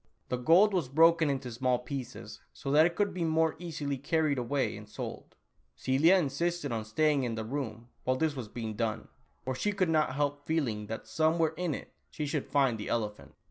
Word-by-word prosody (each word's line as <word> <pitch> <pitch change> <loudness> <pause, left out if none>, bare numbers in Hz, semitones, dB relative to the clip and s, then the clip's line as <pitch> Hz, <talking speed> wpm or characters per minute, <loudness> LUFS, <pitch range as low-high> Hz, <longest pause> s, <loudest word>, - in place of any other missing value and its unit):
The 125 - 0
gold 175 +11 +5
was 170 -9 0
broken 165 +2 +5
into 135 -3 -2
small 125 +1 +1
pieces, 125 0 -7
so 135 - -5
that 155 +3 +6
it 170 - -6
could 205 -1 +1
be 180 - -2
more 160 0 +2
easily 145 -5 -4
carried 150 -1 +1
away 130 -1 -1
and 105 0 -11
sold. - - -7 0.4
Celia 135 - +4
insisted 170 -1 0
on 110 -2 -2
staying 150 +5 +2
in 120 -2 -2
the 110 -1 -4
room, 120 -3 -4 0.2
while 130 - +1
this 155 0 0
was 125 -5 -5
being 110 0 -5
done, 110 0 -2 0.3
for 130 - -2
she 205 +11 0
could 190 -4 0
not 155 -4 +2
help 145 0 -1
feeling 120 -11 -1
that 110 +1 -5
somewhere 160 0 +1
in 170 -3 -1
it - - -10 0.2
she 150 - -4
should 145 -1 -2
find 135 -6 +2
the 105 - -5
elephant. 105 -3 -3
140 Hz, 200 wpm, -30 LUFS, 120-160 Hz, 0.4 s, that